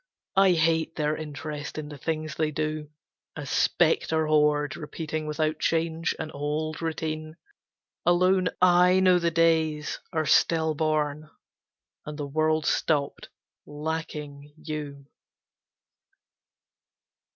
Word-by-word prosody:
I 195 Hz, -1 st, +5 dB
hate 160 Hz, 0 st, +1 dB
their 150 Hz, -1 st, 0 dB
interest 150 Hz, -1 st, -6 dB
in 150 Hz, -1 st, -5 dB
the 145 Hz, -, -9 dB
things 155 Hz, 0 st, -3 dB
they 155 Hz, 0 st, 0 dB
do. 155 Hz, 0 st, -3 dB, 0.5 s
A 145 Hz, -, -6 dB
spectre 160 Hz, +2 st, +2 dB
horde 150 Hz, -1 st, +2 dB
repeating 155 Hz, 0 st, -5 dB
without 155 Hz, 0 st, -1 dB
change 165 Hz, 0 st, 0 dB
An 155 Hz, -1 st, -5 dB
old 150 Hz, +2 st, -3 dB
routine. 155 Hz, -1 st, -4 dB, 0.7 s
Alone 180 Hz, +1 st, +3 dB
I 180 Hz, +1 st, +5 dB
know 185 Hz, -1 st, +5 dB
the 170 Hz, -1 st, +1 dB
days 160 Hz, -2 st, +1 dB
Are 160 Hz, -3 st, 0 dB
still 160 Hz, +1 st, +3 dB
born, 155 Hz, -1 st, -1 dB, 0.7 s
and 150 Hz, 0 st, -7 dB
the 145 Hz, -, -3 dB
world 155 Hz, +2 st, +1 dB
stopped, 145 Hz, -3 st, 0 dB, 0.4 s
lacking 150 Hz, -1 st, -5 dB
you. 150 Hz, -3 st, -6 dB
155 Hz, 110 wpm, -26 LUFS, 150-160 Hz, 0.7 s, I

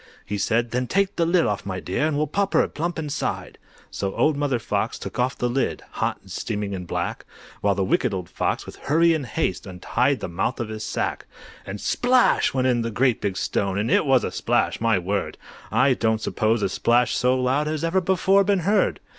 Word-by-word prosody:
He 105 Hz, 0 st, -3 dB
said, 115 Hz, +3 st, +1 dB
"Then 125 Hz, 0 st, -1 dB
take 200 Hz, +5 st, +1 dB
the 170 Hz, -, +1 dB
lid 170 Hz, 0 st, +3 dB
off, 105 Hz, -1 st, -1 dB
my 95 Hz, -1 st, -4 dB
dear, 120 Hz, +14 st, -1 dB
And 155 Hz, -2 st, -1 dB
we'll 150 Hz, -, +2 dB
pop 200 Hz, +6 st, -1 dB
her -, -, +4 dB
plump 170 Hz, +3 st, -3 dB
inside!" 150 Hz, -2 st, -3 dB, 0.3 s
So 100 Hz, -1 st, -3 dB
Old 155 Hz, -, +2 dB
Mother 140 Hz, -3 st, 0 dB
Fox 115 Hz, -, -2 dB
took -, -, -7 dB
off 125 Hz, +1 st, 0 dB
the 120 Hz, -, 0 dB
lid, 130 Hz, +2 st, -1 dB
Hot -, -, -1 dB
and -, -, -15 dB
steaming 105 Hz, -2 st, -3 dB
and 90 Hz, -2 st, -5 dB
black, -, -, -3 dB, 0.4 s
While 100 Hz, -1 st, +2 dB
the 100 Hz, -, 0 dB
Wicked 95 Hz, -, +1 dB
Old 90 Hz, -3 st, -4 dB
Fox, -, -, -2 dB
with -, -, -10 dB
hurry 165 Hz, +3 st, +4 dB
and 150 Hz, -5 st, -2 dB
haste, 95 Hz, -2 st, -2 dB
Untied 120 Hz, +9 st, 0 dB
the -, -, -4 dB
mouth 90 Hz, +9 st, -2 dB
of 115 Hz, -2 st, -3 dB
the 110 Hz, 0 st, -5 dB
sack. -, -, -3 dB, 0.4 s
And 100 Hz, +2 st, -5 dB
SPLASH! 250 Hz, -, +3 dB
went 130 Hz, -2 st, 0 dB
in 125 Hz, -2 st, +2 dB
the 115 Hz, -, -2 dB
great 120 Hz, +1 st, +1 dB
big 100 Hz, -2 st, -2 dB
stone, 100 Hz, +3 st, -1 dB
It -, -, +3 dB
was 130 Hz, -2 st, +4 dB
a -, -, -2 dB
splash! -, -, 0 dB
my 115 Hz, -3 st, +3 dB
word! 95 Hz, +2 st, -2 dB, 0.3 s
I 130 Hz, +5 st, +4 dB
don't 110 Hz, -2 st, +1 dB
suppose 110 Hz, 0 st, 0 dB
a 100 Hz, -, +1 dB
splash 120 Hz, +5 st, +2 dB
so 125 Hz, +1 st, +2 dB
loud 130 Hz, +4 st, +1 dB
Has 155 Hz, 0 st, -2 dB
ever 175 Hz, +3 st, +2 dB
before 190 Hz, +2 st, +3 dB
been 195 Hz, -1 st, +1 dB
heard. 200 Hz, +5 st, +2 dB
125 Hz, 215 wpm, -23 LUFS, 105-155 Hz, 0.4 s, her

